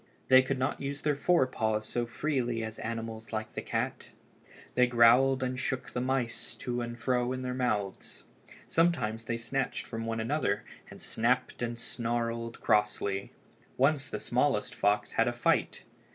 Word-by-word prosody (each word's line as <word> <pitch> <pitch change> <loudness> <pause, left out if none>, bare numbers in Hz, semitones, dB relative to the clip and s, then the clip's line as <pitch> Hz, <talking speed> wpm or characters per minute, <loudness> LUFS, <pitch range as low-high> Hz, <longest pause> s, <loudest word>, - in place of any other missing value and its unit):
They 130 0 +9
could 130 +1 -2
not 130 +2 -1
use 140 +1 -4
their 150 -1 +2
fore 155 +1 +3
paws 110 -4 -1
so 120 -1 -1
freely 120 -3 -1
as 110 0 -6
animals 115 0 -5
like 110 -1 -4
the - - -3
cat. - - -3 0.6
They 125 0 +4
growled 125 +3 +5
and 130 0 -2
shook 130 0 -2
the 125 - -2
mice 130 -2 -1
to 120 -1 -3
and 120 0 -5
fro 125 0 +1
in 130 0 -4
their 125 0 -2
mouths. 110 -6 -2 0.4
Sometimes 115 -10 +1
they 115 0 -1
snatched 135 +3 -2
from 115 -1 -5
one 115 0 -2
another 115 -2 0 0.3
and - - -11
snapped 125 +3 0
and 120 -1 -3
snarled 115 0 -2
crossly. 105 -2 +1 0.5
Once 140 0 +2
the - - -4
smallest 125 -3 +1
fox 105 +1 +1
had - - +2
a - - +1
fight. - - +1
120 Hz, 165 wpm, -30 LUFS, 115-130 Hz, 0.6 s, They